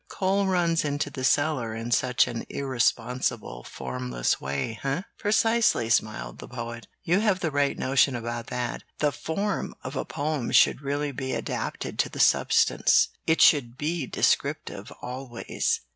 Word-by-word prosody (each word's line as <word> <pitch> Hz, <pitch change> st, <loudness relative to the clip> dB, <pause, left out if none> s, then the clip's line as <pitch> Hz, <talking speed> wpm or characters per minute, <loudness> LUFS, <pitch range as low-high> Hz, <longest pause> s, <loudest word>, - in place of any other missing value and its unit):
Coal 195 Hz, +1 st, +1 dB
runs 170 Hz, -3 st, +2 dB
into 145 Hz, 0 st, -2 dB
the 130 Hz, -, -6 dB
cellar 135 Hz, -5 st, +1 dB
in 115 Hz, +1 st, -5 dB
such 125 Hz, -1 st, +3 dB
an 115 Hz, -1 st, -4 dB
irresponsible, 120 Hz, -, -1 dB
formless 65 Hz, -1 st, -2 dB
way, 70 Hz, +12 st, -3 dB
eh?" 140 Hz, +6 st, -1 dB, 0.2 s
"Precisely," 220 Hz, -, +2 dB
smiled -, -, 0 dB
the -, -, -8 dB
Poet. 120 Hz, -1 st, -7 dB, 0.2 s
"You 175 Hz, +4 st, +2 dB
have 205 Hz, -4 st, +1 dB
the 160 Hz, -4 st, 0 dB
right 145 Hz, 0 st, +1 dB
notion 135 Hz, 0 st, +3 dB
about 120 Hz, 0 st, -4 dB
that. 125 Hz, -1 st, -3 dB, 0.2 s
The 150 Hz, -1 st, +2 dB
form 195 Hz, +8 st, -3 dB
of 130 Hz, +3 st, -6 dB
a -, -, -1 dB
poem 150 Hz, -4 st, -2 dB
should -, -, +5 dB
really 145 Hz, +1 st, -2 dB
be 130 Hz, -1 st, -4 dB
adapted -, -, -4 dB
to -, -, +2 dB
the -, -, -9 dB
substance. -, -, +4 dB, 0.2 s
It 160 Hz, -, +3 dB
should 125 Hz, -5 st, +5 dB
be 155 Hz, -1 st, -2 dB
descriptive, -, -, 0 dB
always. 125 Hz, -1 st, -2 dB
135 Hz, 150 wpm, -26 LUFS, 120-155 Hz, 0.2 s, should